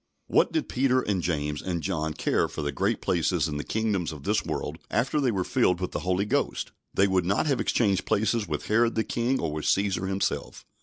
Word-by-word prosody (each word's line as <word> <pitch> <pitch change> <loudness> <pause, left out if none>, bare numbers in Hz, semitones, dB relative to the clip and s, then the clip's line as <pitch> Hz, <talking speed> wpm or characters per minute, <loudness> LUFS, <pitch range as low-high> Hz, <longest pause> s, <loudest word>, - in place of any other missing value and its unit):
What - - +3
did 320 -2 -1
Peter 130 0 +2
and 100 -6 -1
James 75 -3 -2
and 85 -3 -3
John 80 -5 -2
care - - +1
for 75 - -5
the 70 - -1
great 100 +8 0
places 85 -2 +1
in 75 -2 -3
the 75 - -3
kingdoms 105 -7 -1
of 75 -3 -9
this - - +1
world - - -4
after 135 +5 +1
they 130 - +2
were 95 -5 0
filled 90 0 +2
with 90 - -3
the - - -2
Holy 90 +3 0
Ghost? 140 +7 -1 0.2
They 100 - +3
would 95 -2 +2
not 100 - +1
have 140 -4 +1
exchanged 100 -5 +1
places 110 0 +1
with 75 -2 -3
Herod 115 +2 +2
the 110 - +2
king 120 +4 0
or 80 -2 -2
with 75 0 -4
Caesar 95 -1 +1
himself. 95 +1 -2
95 Hz, 220 wpm, -27 LUFS, 85-110 Hz, 0.2 s, What